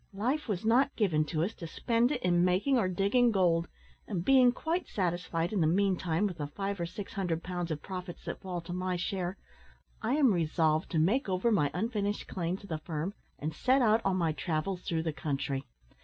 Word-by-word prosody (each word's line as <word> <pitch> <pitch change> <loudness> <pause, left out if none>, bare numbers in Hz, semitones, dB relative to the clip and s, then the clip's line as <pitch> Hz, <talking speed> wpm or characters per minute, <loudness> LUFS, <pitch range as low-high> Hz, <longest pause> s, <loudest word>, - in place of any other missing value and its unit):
Life 260 +9 -1
was 205 -1 -2
not 250 +5 +3
given 165 -8 +2
to 155 0 -1
us 205 +6 -2
to 170 - -8
spend 235 - +1
it 265 - -2
in 175 -1 +3
making 190 +9 +3
or 195 - +2
digging 200 +7 +3
gold; 175 -5 +2 0.4
and, 180 -5 -3
being 260 -2 +6
quite 330 +8 -2
satisfied, 175 -1 -1
in 200 - +1
the 155 - +4
meantime, 185 0 +1
with 180 -5 -3
the 145 - -2
five 195 +5 -4
or 170 - -1
six 195 +3 -7
hundred 175 -5 -2
pounds 175 -1 -3
of 155 -2 -4
profits 180 -2 -7
that - - -5
fall 180 -2 -4
to 170 +1 -7
my 185 0 -1
share, 185 +1 -2 0.6
I 230 +5 +1
am 275 -7 +4
resolved 160 -1 +1
to - - +2
make 195 - +2
over 190 +5 +1
my 150 -9 +3
unfinished 205 0 -1
claim 175 0 -2
to 200 - -13
the 160 -5 -4
firm, 160 +4 -4 0.2
and 155 +2 -3
set 260 - +3
out 220 0 +4
on 195 -1 +1
my 165 -3 +1
travels 170 +3 -2
through 165 -2 -1
the 160 -2 -2
country. 135 -2 -2
185 Hz, 210 wpm, -31 LUFS, 165-210 Hz, 0.6 s, being